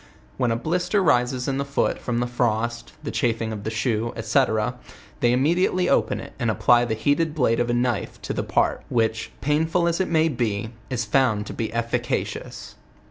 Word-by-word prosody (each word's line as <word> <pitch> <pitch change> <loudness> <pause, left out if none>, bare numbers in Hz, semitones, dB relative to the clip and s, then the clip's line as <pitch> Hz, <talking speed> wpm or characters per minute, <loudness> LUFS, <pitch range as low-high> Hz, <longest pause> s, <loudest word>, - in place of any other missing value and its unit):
When 125 - +1
a 115 - +1
blister 180 - 0
rises 125 -4 +2
in 135 0 -1
the - - +1
foot 140 0 0
from 120 -1 -2
the - - +1
frost, 120 0 -1
the 145 - -3
chafing 115 -3 0
of 105 -2 -6
the 110 - -2
shoe, 110 0 -1
&c., 110 0 +3 0.8
they 120 - +3
immediately 175 +8 +2
open - - +2
it, - - -9
and - - 0
apply 120 0 +4
the 110 -2 -1
heat 145 +8 +1
ed 160 -2 0
blade 125 -6 +2
of 120 0 0
a - - +1
knife 120 -4 -1
to - - -3
the - - -1
part, - - 0
which, 115 -1 0
painful 160 +4 +1
as 170 +2 +1
it 190 - 0
may 160 -1 +3
be, 115 -6 -2 0.2
is 120 -2 -1
found 110 -2 +2
to - - -7
l>e 110 - -3
efficacious. 120 +1 -3
120 Hz, 195 wpm, -24 LUFS, 115-145 Hz, 0.8 s, apply